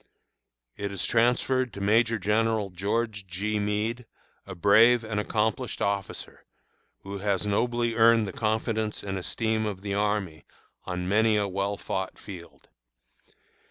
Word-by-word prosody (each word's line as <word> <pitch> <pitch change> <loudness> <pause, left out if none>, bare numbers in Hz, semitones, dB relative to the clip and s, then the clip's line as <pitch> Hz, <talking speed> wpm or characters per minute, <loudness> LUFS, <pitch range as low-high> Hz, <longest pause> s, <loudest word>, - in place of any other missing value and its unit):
It 100 0 -3
is 100 -3 -2
transferred 125 +2 +2
to - - -7
Major 115 +3 +3
General 105 0 +1
George 105 +2 -2
G. 105 +4 -2
Meade, 105 +4 -2 0.4
a 95 - -7
brave 110 +6 +5
and 110 -1 -2
accomplished 110 +3 -1
officer, 100 -1 -3 0.6
who 100 0 -6
has 100 0 0
nobly 120 +3 0
earned 115 -1 +5
the 95 - -6
confidence 110 -1 -1
and 95 -1 -3
esteem 110 +3 -1
of 100 -3 -5
the 100 -1 -3
army 100 -5 -1 0.4
on 90 -1 -3
many 110 +2 +3
a 100 -1 +1
well 100 +1 -2
fought 95 -1 -4
field. 90 -4 -11
105 Hz, 135 wpm, -27 LUFS, 100-115 Hz, 0.6 s, brave